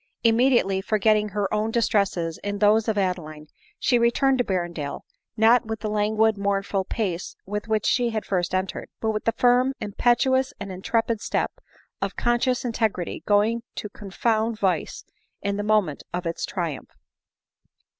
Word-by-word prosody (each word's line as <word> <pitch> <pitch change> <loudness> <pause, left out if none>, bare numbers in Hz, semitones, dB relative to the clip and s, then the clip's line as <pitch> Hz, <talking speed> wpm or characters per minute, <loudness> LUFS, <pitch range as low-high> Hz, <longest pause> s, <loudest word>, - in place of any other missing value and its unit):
Immediately 230 -4 +3
forgetting 215 +1 +2
her 205 0 -2
own 215 +1 +1
distresses 200 -7 0
in 205 0 -2
those 215 +2 +4
of 220 -2 0
Adeline, 170 -6 -2 0.3
she 245 - +2
returned 260 +3 +3
to - - +4
Berrendale, 175 -7 -3 0.4
not 230 +2 +5
with 220 -1 -4
the 215 - -2
languid, 215 0 +2
mournful 200 -1 0
pace 190 -5 -3
with 210 +3 -4
which 215 -1 0
she 240 -1 +2
had 220 -2 -3
first 180 -1 -1
entered, 185 +1 -3
but 220 - 0
with 215 -1 -4
the 230 - +3
firm, 250 +3 +3
impetuous 255 +5 +1
and 195 - -6
intrepid 225 +4 -1
step - - -1 0.5
of - - -2
conscious 240 +1 +1
integrity 220 -7 -1
going 215 +3 +3
to 210 - -5
confound 220 +3 -1
vice 190 -3 -1 0.4
in 200 0 -1
the - - -1
moment 210 -8 +1
of 180 0 -4
its 165 0 -2
triumph. 170 -7 -4
210 Hz, 155 wpm, -24 LUFS, 195-230 Hz, 0.5 s, not